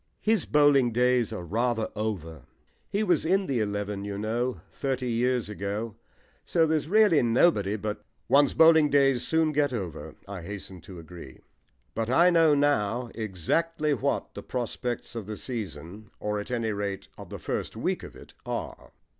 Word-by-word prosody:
"His 215 -4 +2
bowling 145 -4 +4
days 125 -1 +2
are 90 - -5
rather 115 +4 0
over. 80 - -4 0.4
He 205 +2 0
was 180 -6 +2
in 190 +4 +2
the 135 -7 -1
eleven, 100 -1 -2
you 100 -1 -4
know, 120 +4 -2
thirty 130 -2 -2
years 125 0 +1
ago. 105 +2 -4 0.5
So 165 -1 +2
there's 155 -2 0
really 210 -4 +5
nobody 115 - +3
but 105 0 -4
" 110 - -44
"One's 140 0 +4
bowling 160 -2 +6
days 135 -3 +3
soon 160 -1 +2
get 145 -2 +1
over," 95 - -5
I 100 -2 -6
hastened 95 0 -8
to 95 - -10
agree. 85 -5 -11 0.5
But 115 0 -2
I 170 +8 +5
know 165 -3 +5
now 125 -5 +1
exactly 150 - -1
what 130 - -1
the - - -7
prospects 125 0 -4
of 110 -4 -5
the 105 -1 -5
season 105 - -6
or, 105 0 -2
at 105 - -7
any 115 -3 -1
rate, 100 -1 -4
of - - -11
the - - -6
first - - -4
week - - -1
of - - -10
it - - -14
are. - - -6
120 Hz, 170 wpm, -27 LUFS, 105-145 Hz, 0.5 s, bowling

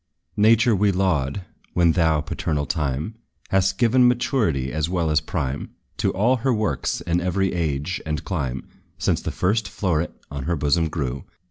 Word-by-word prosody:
Nature 115 +2 +5
we 100 +1 +3
laud, 90 -3 0 0.3
when 85 -2 +4
thou, 80 -3 +2
paternal 75 -1 -2
Time, 75 - -2 0.4
Hast 95 -1 +2
given 125 +2 +4
maturity, 105 - +1
as 80 +1 -1
well 85 -3 0
as 75 - +3
prime, 70 +2 -3 0.3
To - - +1
all 120 +7 +2
her 130 +3 0
works, 110 -3 -1
in 85 +1 0
every 95 +2 0
age 80 0 -2
and 80 -1 -3
clime, 65 -9 -3 0.3
Since - - 0
the - - -3
first 105 +2 0
floweret 90 -5 0 0.2
on 70 -2 -5
her 85 +2 0
bosom 80 +2 +1
grew. 70 -4 -3
85 Hz, 160 wpm, -23 LUFS, 75-100 Hz, 0.4 s, Nature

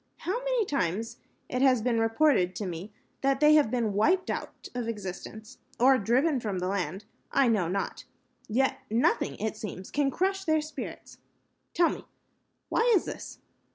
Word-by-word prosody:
How 390 +7 -2
many - - +1
times 225 - -2 0.3
it 255 - -2
has 255 -4 +4
been 235 -2 +1
reported 225 -5 +3
to 210 - -3
me 180 +3 -6 0.3
that 270 0 +2
they 300 +1 +6
have 300 -6 +5
been 230 -3 0
wiped 350 - +2
out - - -6
of 245 -2 -3
existence, 215 +2 -7 0.2
or 260 +2 +6
driven 260 +7 +2
from 210 -5 -3
the 180 0 -2
land, 190 0 -2 0.3
I 275 -2 +4
know 210 -7 +2
not. 195 +3 -3 0.4
Yet 260 +5 +1
nothing, 225 +3 +1
it 220 +1 -2
seems, 195 -3 -7
can 285 -1 +1
crush 385 +5 0
their 315 -3 +2
spirit. 305 +1 -8 0.6
Tell 340 -1 +4
me, - - -6 0.7
why 470 +1 +3
is 370 - +2
this?" - - -8
235 Hz, 165 wpm, -28 LUFS, 210-300 Hz, 0.7 s, they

